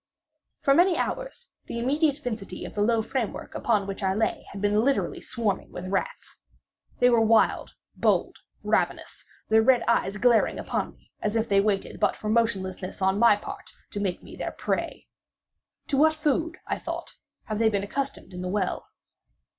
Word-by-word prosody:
For 275 - +4
many 350 +3 +4
hours - - -4 0.2
the - - -5
immediate 285 +4 +1
vicinity 230 -8 -5
of - - -8
the 205 - -1
low 225 +1 +2
framework 230 -1 -3
upon 210 -4 +1
which 195 +1 -5
I 190 -1 +1
lay 220 0 -1
had 200 - -7
been 205 +2 +2
literally 275 +2 0
swarming 215 -5 -2
with 180 +1 -6
rats. 195 - -3 0.6
They 245 0 +5
were 235 -1 +4
wild, 225 0 +3 0.2
bold, - - +1 0.3
ravenous—their 220 0 0
red 245 +1 +4
eyes 210 -3 +1
glaring 230 +1 +3
upon - - -3
me - - -30
as 210 +1 -1
if 225 0 +1
they 200 -1 +4
waited 200 -1 -1
but - - +2
for 215 - -5
motionlessness 195 -5 -1
on 190 +1 +2
my 235 -2 +7
part 205 - -9 0.2
to 205 - -4
make 190 -3 -2
me - - -11
their - - -4
prey. - - -3 0.8
"To 275 - +1
what 315 +2 +5
food," 315 +3 0
I - - -2
thought, - - -5 0.3
"have 215 -1 -4
they 225 -1 +4
been 200 -2 -1
accustomed 275 -1 -4
in 180 - -6
the 180 - -3
well?" 195 -1 -1
220 Hz, 175 wpm, -26 LUFS, 200-260 Hz, 0.8 s, my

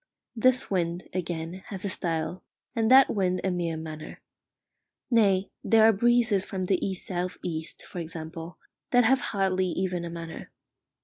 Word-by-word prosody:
This 255 +1 +2
wind, 175 -1 -1
again, 175 0 -4
has 195 -1 -6
a - - 0
style, 170 0 -2 0.3
and 225 -1 +2
that 265 +1 +7
wind 185 -3 +1
a 190 - +1
mere 170 -2 -2
manner. 155 -1 -8 0.9
Nay, 200 -5 +3
there 220 -1 +6
are 225 - +6
breezes 230 -2 +3
from 190 -2 -4
the 185 0 +1
east 190 -2 -3
south 180 0 -3
east, 160 -2 -4
for 180 - -7
example, 165 +1 -7 0.3
that 245 0 +5
have 260 +3 +4
hardly 190 -5 0
even 180 -1 -2
a 170 - -4
manner. 165 -1 -7
185 Hz, 160 wpm, -27 LUFS, 170-205 Hz, 0.9 s, that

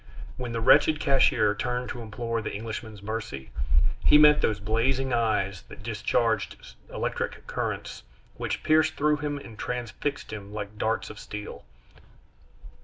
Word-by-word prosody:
When 125 -2 -5
the 115 0 -2
wretched 155 +6 +5
cashier 135 -7 +4
turned 125 +3 -2
to 120 - -5
implore 115 +1 -3
the - - -4
Englishman's 110 -1 -6
mercy, 105 - -5 0.5
he - - +7
met 150 0 +7
those 105 -2 +1
blazing 125 +5 +1
eyes 100 -6 +1
that - - -12
discharged 110 - -1 0.2
electric - - -3
currents, - - -4 0.3
which - - -3
pierced 155 0 +3
through 150 +1 +2
him 145 0 -3
and 115 -6 -11
transfixed 125 +4 -3
him 100 -1 -7
like 105 0 -6
darts 110 +1 0
of 105 - -11
steel. 105 -10 -7
115 Hz, 140 wpm, -27 LUFS, 105-130 Hz, 0.5 s, he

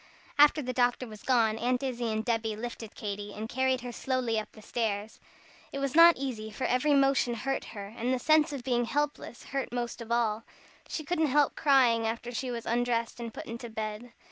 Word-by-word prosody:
After 295 +1 +6
the 255 0 -3
doctor 245 0 +1
was 215 -3 -11
gone, 225 -4 +2
Aunt 250 +2 0
Izzie 245 -3 -2
and 220 0 -2
Debby 225 -2 0
lifted 225 -1 -7
Katy, 205 0 -5
and 215 +1 -5
carried 260 +1 0
her 245 0 -6
slowly 245 -2 -1
up 215 - -5 0.2
stairs. 215 -2 -2 0.5
It - - -5
was 275 -1 -1
not 335 +1 +8
easy, 240 -6 -4
for 255 - -6
every 265 +4 +2
motion 270 -3 +3
hurt 270 +4 -2
her, 200 -1 -8
and 240 +2 -1
the 260 - +2
sense 310 +3 +3
of 275 -4 -5
being 240 -2 +1
helpless 290 -2 -3
hurt 270 -2 -3
most 240 0 -3
of 230 0 -8
all. 225 -2 +1 0.4
She 310 - -4
couldn't 320 0 +1
help 290 +1 +3
crying 245 -6 +4
after 235 +2 -4
she 255 +2 -3
was 235 -2 -4
undressed 235 0 0
and 235 -1 -5
put - - -8
into 235 +1 -7
bed. 220 +2 -5
240 Hz, 200 wpm, -29 LUFS, 225-265 Hz, 0.5 s, not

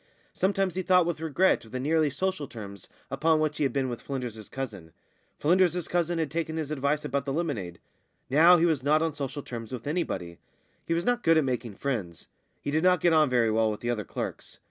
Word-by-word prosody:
Sometimes 195 -1 0
he 185 - -2
thought 180 -1 +4
with 170 -2 -2
regret 165 +4 +2
of 110 - -15
the 130 - -3
nearly 155 +3 +2
social 185 +1 -2
terms 100 -5 -9 0.2
upon 160 0 +2
which 155 -1 0
he - - 0
had 135 - +1
been 135 +1 0
with 120 -2 -5
Flynders's 120 -6 -6
cousin; 105 -12 -6 0.4
Flynders's 175 +1 +2
cousin 175 -1 0
had 160 -3 -1
taken 160 -1 -2
his 155 -2 -3
advice 145 +1 0
about 140 +1 -1
the 140 - -2
lemonade. 130 - -3 0.5
Now 165 +6 +6
he 170 - +3
was 160 -5 +1
not 150 +4 +3
on 165 -2 -1
social 140 -1 -5
terms 115 -2 -7
with 125 -3 -6
anybody. 95 - -3 0.5
He 165 - +1
was 170 +2 -1
not 245 0 +1
good 165 -4 +4
at 155 - +4
making 120 -5 -3
friends. 105 - -4 0.4
He 145 - -2
did 155 +2 +1
not 180 -1 +4
get 175 0 +3
on 155 -3 +4
very 120 -3 +2
well 110 0 +2
with 105 - -4
the 120 - -1
other 110 -3 -2
clerks. - - -6
145 Hz, 220 wpm, -27 LUFS, 120-165 Hz, 0.5 s, Now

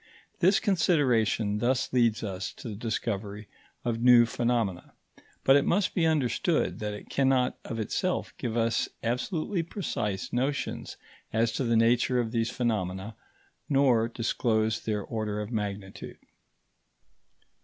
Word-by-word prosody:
This 190 +2 +4
consideration 125 - +2
thus 130 +3 0
leads 115 -4 +2
us 95 -2 -4
to - - -10
the - - -5
discovery 105 -2 -3 0.4
of 115 -1 -1
new 120 -1 +7
phenomena; 115 -6 -1 0.5
but 135 - +6
it 140 - +5
must 195 +4 +1
be 165 -3 +2
understood 145 -7 +1
that 105 -1 -3
it - - -11
cannot 130 -2 +2
of 115 - -5
itself 180 - -2
give 120 -2 -2
us 115 0 +1
absolutely 155 - -1
precise 105 - -3
notions 135 +4 -2 0.3
as 115 +1 +1
to 130 - -2
the 115 -2 +2
nature 120 +2 +3
of 115 -2 -1
these 115 -1 0
phenomena, 105 -4 -2 0.5
nor 130 -5 +3
disclose 110 -1 0
their 105 -2 -2
order 110 -2 -3
of 105 +2 -5
magnitude. 100 -3 -5
115 Hz, 135 wpm, -28 LUFS, 110-130 Hz, 0.5 s, new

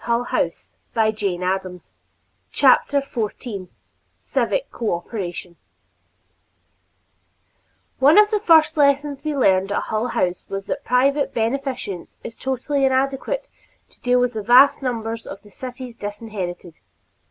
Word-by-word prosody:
[Editor: 235 +1 0 0.5
Mary 220 -1 +2
MarkOckerbloom] 185 - -3 0.6
CHAPTER 280 +1 +4
XIV 215 -6 -5 0.5
CIVIC - - -1
COOPERATION 175 -4 -4 2.4
One 285 +6 +6
of 420 +1 +6
the 425 - +2
first 320 -5 +4
lessons 285 0 +2
we 305 -1 -2
learned 195 -5 +3
at - - 0
Hull 220 +2 -2
House 180 -6 -1
was 195 0 -4
that 280 - -4
private 275 +3 +1
beneficence 235 - -3
is 230 - -7
totally 265 +3 -2
inadequate 270 - 0 0.4
to - - -26
deal 250 0 +3
with 250 0 +1
the 220 - -3
vast 250 +8 +6
numbers 230 -3 -3
of 195 - -8
the 205 - -17
city's 250 +2 -8
disinherited. 205 -5 -6
240 Hz, 120 wpm, -21 LUFS, 200-275 Hz, 2.4 s, One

